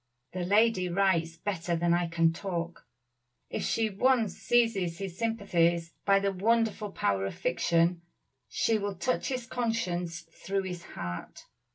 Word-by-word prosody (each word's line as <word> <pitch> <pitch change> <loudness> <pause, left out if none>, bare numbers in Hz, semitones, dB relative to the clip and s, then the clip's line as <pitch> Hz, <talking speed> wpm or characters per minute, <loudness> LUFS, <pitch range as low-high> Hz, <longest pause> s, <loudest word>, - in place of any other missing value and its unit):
The 180 -1 -2
lady 200 -1 +3
writes 170 -3 +1
better 175 -3 -2
than 170 +1 +2
I 175 0 +1
can 165 -1 +2
talk. 170 -2 -5 0.6
If - - -2
she 220 -1 0
once 225 -1 +2
seizes 215 -8 +1
his 190 -2 -5
sympathies 175 -7 +1
by 195 -1 +5
the 200 0 0
wonderful 215 +1 +1
power 100 - 0
of - - -6
fiction, 170 0 +1 0.5
she 215 +6 +1
will 200 -1 -3
touch 255 +8 -1
his 255 -2 -2
conscience 185 -9 -2
through 195 +4 -4
his 180 -2 -5 0.2
heart. 90 0 -6
185 Hz, 145 wpm, -29 LUFS, 170-215 Hz, 0.6 s, by